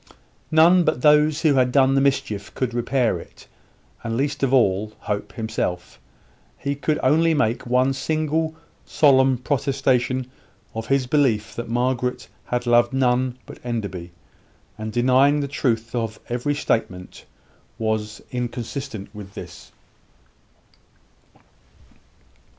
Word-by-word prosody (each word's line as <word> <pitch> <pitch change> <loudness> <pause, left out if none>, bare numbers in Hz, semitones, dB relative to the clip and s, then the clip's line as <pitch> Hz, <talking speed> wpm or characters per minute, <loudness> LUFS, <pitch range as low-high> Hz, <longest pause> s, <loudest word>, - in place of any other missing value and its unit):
None 170 +3 +5
but 155 -6 -1
those 150 +1 +4
who 155 -4 +4
had 130 -2 +3
done 135 0 +4
the 135 - +3
mischief 135 -8 -1
could 125 -2 -2
repair 120 -4 0
it; - - -14 0.6
and 115 0 -2
least 145 +1 -1
of 135 -2 +1
all, 105 -4 +2
Hope 105 0 -4
himself. 110 -6 -4 0.6
He 140 - -2
could 150 +2 -1
only 160 +4 +3
make 120 -4 0
one 130 +2 +2
single, 155 +3 -1 0.3
solemn 130 -3 +4
protestation 130 -1 0 0.5
of 110 0 -5
his 135 -1 +2
belief 125 -6 +1
that 120 -1 -5
Margaret 125 +1 -1 0.2
had 125 0 -2
loved 120 +1 +3
none 130 -1 +1
but - - -13
Enderby, 100 -8 -4 0.7
and 110 0 -6
deny 130 +4 +4
the 140 - -2
truth 115 -5 -1
of 115 -3 -3
every 125 +5 -1
statement 90 -9 -2
that - - -15 0.6
was 110 -1 -2
inconsistent 120 -2 -5
with 100 -2 -10
this. - - -10
125 Hz, 125 wpm, -22 LUFS, 115-140 Hz, 0.7 s, None